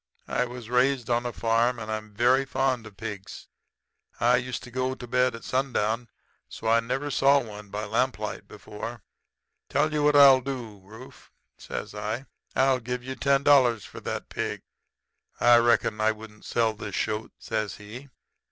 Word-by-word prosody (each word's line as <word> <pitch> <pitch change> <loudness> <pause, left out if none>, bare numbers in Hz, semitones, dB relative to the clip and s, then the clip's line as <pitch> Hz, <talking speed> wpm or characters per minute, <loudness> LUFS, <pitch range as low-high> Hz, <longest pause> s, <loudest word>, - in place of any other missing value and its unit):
I 125 - 0
was 125 -2 -8
raised 125 0 +1
on 120 +1 +1
a - - -3
farm, 115 +2 +1
and 110 -1 -6
I'm 110 0 -4
very 125 +4 +4
fond 130 -4 -1
of 100 -2 -15
pigs. 100 -3 -7 0.7
I 120 +2 +4
used 125 0 -4
to 125 - -11
go 130 +1 -1
to 125 - -9
bed 125 +1 +1
at 115 - -10
sundown, 120 -3 -1 0.4
so 110 - -6
I 115 +1 +5
never 135 +5 -3
saw 140 +1 +5
one 105 -4 -9
by 105 +2 -4
lamplight 130 +5 -2
before. 110 +1 -8 0.7
Tell 150 +3 +1
you 150 - +1
what 150 0 +4
I'll 135 -2 +8
do, 120 -6 -6
Rufe,' 110 +6 -14
I - - -30 0.2
says. - - -14 0.6
'I'll 130 -1 +3
give 125 +1 -4
you 130 +1 -5
ten 140 +1 +2
dollars 125 -7 +4
for - - -10
that - - -5
pig.' - - -4 0.8
"'I 120 0 +7
reckon 120 -2 +2
I 110 +1 +3
wouldn't 110 -1 -13
sell 115 -2 +1
this 105 - -6
shoat,' 110 0 -2
says 105 -3 -3
he. 115 +7 -10
120 Hz, 170 wpm, -26 LUFS, 110-130 Hz, 0.8 s, I'll